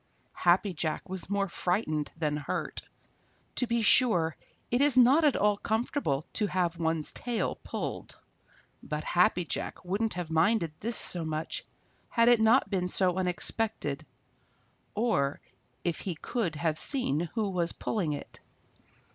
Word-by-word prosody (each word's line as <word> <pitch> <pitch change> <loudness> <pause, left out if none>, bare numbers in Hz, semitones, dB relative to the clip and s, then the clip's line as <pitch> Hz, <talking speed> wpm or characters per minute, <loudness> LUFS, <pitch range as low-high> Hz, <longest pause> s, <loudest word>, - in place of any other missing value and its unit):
Happy 185 +3 +3
Jack 155 -1 -3
was 190 -1 -5
more 200 -1 0
frightened 170 -5 -1
than 150 -2 0
hurt. 145 -1 -3 0.8
To 250 - +2
be 235 0 +1
sure, 180 -9 +4 0.4
it 245 +2 +2
is 285 -3 +5
not 260 +6 +6
at 295 -3 +4
all 205 0 +2
comfortable 220 - -1
to 210 - +1
have 175 -3 0
one's 160 -2 0
tail 240 -2 -2
pulled, - - -5 0.6
but 150 0 -4
Happy 180 0 +2
Jack 170 - -4
wouldn't 205 +4 -1
have 175 -3 -4
minded 170 +1 +2
this 230 +2 -1
so 175 -2 +2
much 155 0 -3 0.5
had 230 0 +4
it 240 -2 +5
not 225 +4 +5
been 180 -3 -1
so 180 -1 +2
unexpected, 205 +5 -2 0.9
or 180 -11 +1 0.4
if 170 -3 -1
he 185 -4 -4
could 175 0 -2
have 155 0 -1
seen 170 - 0
who 215 -3 0
was 175 -2 0
pulling 180 -9 -2
it. 145 - -8
180 Hz, 145 wpm, -29 LUFS, 160-225 Hz, 0.9 s, not